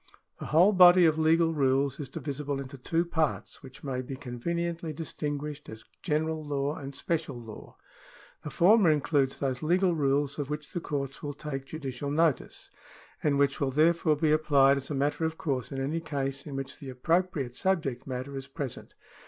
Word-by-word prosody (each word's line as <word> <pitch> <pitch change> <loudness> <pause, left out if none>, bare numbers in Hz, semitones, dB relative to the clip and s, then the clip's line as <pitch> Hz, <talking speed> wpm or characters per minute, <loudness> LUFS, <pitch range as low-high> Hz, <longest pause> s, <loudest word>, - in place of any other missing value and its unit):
The - - -6
whole 175 +7 +5
body 180 -1 +8
of 160 -1 +3
legal 165 +1 +3
rules 140 -1 +1
is 140 -4 -5
divisible 140 +1 -4
into 140 0 -7
two 165 +6 -1
parts, 160 -3 -2
which 130 0 -13
may 130 -3 -2
bo 130 +1 -6
conveniently 165 +6 -3
distinguished 150 -1 -5
as 110 0 -10 0.2
General 160 0 -1
law 145 -1 -1
and 140 -2 -8
Special 155 -6 -2
law. 110 -2 -11 0.6
The 150 - -6
former 190 +3 +5
includes 145 -2 +1
those 130 -3 -2
legal 180 +3 +2
rules 140 -1 0
of 145 -1 -3
which 150 0 -5
the 175 - -1
courts 140 -4 -4
will 145 -1 -5
take 135 -2 -5
judicial 140 -2 -5
notice, 155 0 0 0.5
and 145 -2 +2
which 140 0 +1
will 140 - +2
therefore 155 +2 +3
be 150 +1 +1
applied 140 -3 +4
as 140 0 -6
a 150 - -2
matter 145 +4 0
of 160 0 -1
course 140 -10 -2
in 135 - -4
any 145 +5 -1
case 140 -3 -3
in 140 - -6
which 135 0 -6
the 140 - -8
appropriate 140 -1 0
subject 150 -11 -1
matter 130 +2 -5
is 135 0 -6
present. 140 -7 -7
145 Hz, 180 wpm, -28 LUFS, 135-160 Hz, 0.6 s, body